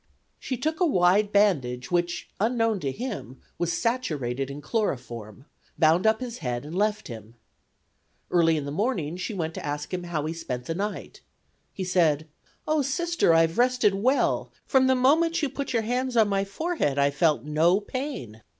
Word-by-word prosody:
She 255 - -4
took 315 +6 -2
a - - +3
wide 195 - +3
bandage 140 -13 +1
which, 175 0 -1
unknown 225 -1 +1
to 140 -5 -2
him, 205 - -6 0.2
was 170 -1 0
saturated 140 - -1
in 140 +1 -6
chloroform, 130 - -3 0.3
bound 165 +5 +4
up 220 +1 +3
his 245 -2 -5
head 125 +1 -3
and 155 - -8
left 210 +2 0
him. 115 -1 -10 1.0
Early 165 -2 +4
in 145 - -3
the 140 - -4
morning 175 - -1
she 200 +4 -4
went 160 -3 -3
to - - -7
ask 150 +3 -4
him 180 -1 -3
how 160 -4 -2
he 160 - -2
spent 125 -7 -5
the 165 - -2
night. 205 +4 -5 0.5
He 190 - -5
said: 160 -4 +2 0.4
"Oh, 310 -1 +2
Sister, 335 - +1
I 165 - +6
have 165 +5 0
rested 245 -4 +3
well; 250 +8 +1
from 260 -1 +3
the 260 - +4
moment 325 +6 +3
you 290 - +1
put 280 +2 -4
your 230 -3 +1
hands 250 +2 -1
on 220 -2 +5
my 195 -1 0
forehead 200 - -1
I 140 - +4
experienced 145 +2 +1
no 160 +5 +3
pain." 210 - -6
185 Hz, 180 wpm, -26 LUFS, 150-245 Hz, 1.0 s, I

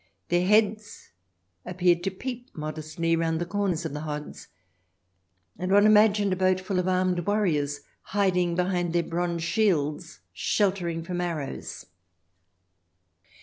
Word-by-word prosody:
Their 175 +1 +2
heads 215 0 +1 0.5
appeared 175 -1 +1
to - - +2
peep 245 +6 -7
modestly 155 +2 -2
round 165 -1 0
the 175 - -2
corners 185 -3 -1
of 160 - -4
the 150 - -4
hods, 150 -1 -6 1.1
and 185 +1 -2
one 205 +1 +6
imagined 210 -2 +5
a - - 0
boat 185 0 +2
full 185 0 -2
of 180 - -1
armed 185 -1 +1
warriors 155 -9 0 0.2
hiding 180 -4 +1
behind 180 -1 0
their 170 -1 +2
bronze 170 0 -2
shields, 170 - 0
sheltering 175 - 0
from 175 +1 -3
arrows. 160 -6 -5
180 Hz, 130 wpm, -26 LUFS, 165-195 Hz, 1.1 s, one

